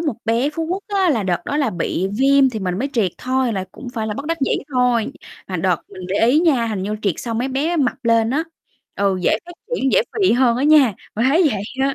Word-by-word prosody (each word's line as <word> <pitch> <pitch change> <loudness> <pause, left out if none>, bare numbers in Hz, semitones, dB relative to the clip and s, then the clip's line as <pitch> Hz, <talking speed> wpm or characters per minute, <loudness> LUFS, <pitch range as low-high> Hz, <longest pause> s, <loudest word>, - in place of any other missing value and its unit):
một 300 -8 -1
bé 235 +5 +1
Phú 325 +2 -3
Quốc 375 +4 -3
á 390 -3 +2
là 230 -8 +1
đợt 175 -2 -1
đó 290 - -2
là 290 -3 +1
bị 175 +2 -2
viêm 275 0 +4
thì 225 - -4
mình 180 -1 -2
mới 270 +5 -1
triệt 210 - +1
thôi 255 -2 0
là 190 -2 -2
cũng 255 - -9
phải 220 -1 -2
là 210 - -3
bất 275 +5 -6
đắc 330 +1 -1
dĩ 270 - +1 0.2
thôi. 250 -3 +1 0.3
Mà 185 - -3
đợt 180 +1 +1
mình 190 -2 -11
để 200 +4 +2
ý 275 +6 +4
nha, 280 -9 +2
hình 210 -4 -3
như 210 +2 -3
triệt 195 -5 +1
xong 230 -2 -4
mấy 250 +3 -1
bé 295 +6 -1
mập 260 -3 -1
lên 230 -1 +3
á, 305 +5 0 0.5
ừ, 200 -1 +1
dễ - - +2
phát 350 - -9 0.2
triển, 265 - 0
dễ - - +5 0.2
phì 380 - +4
hơn 240 -1 +3
á 260 - 0
nha, 295 -7 +6 0.2
mình 230 +4 +1
thấy 325 +6 +4
vậy 200 -2 -3 0.2
á, 275 0 +1
250 Hz, 260 wpm, -20 LUFS, 210-285 Hz, 0.5 s, nha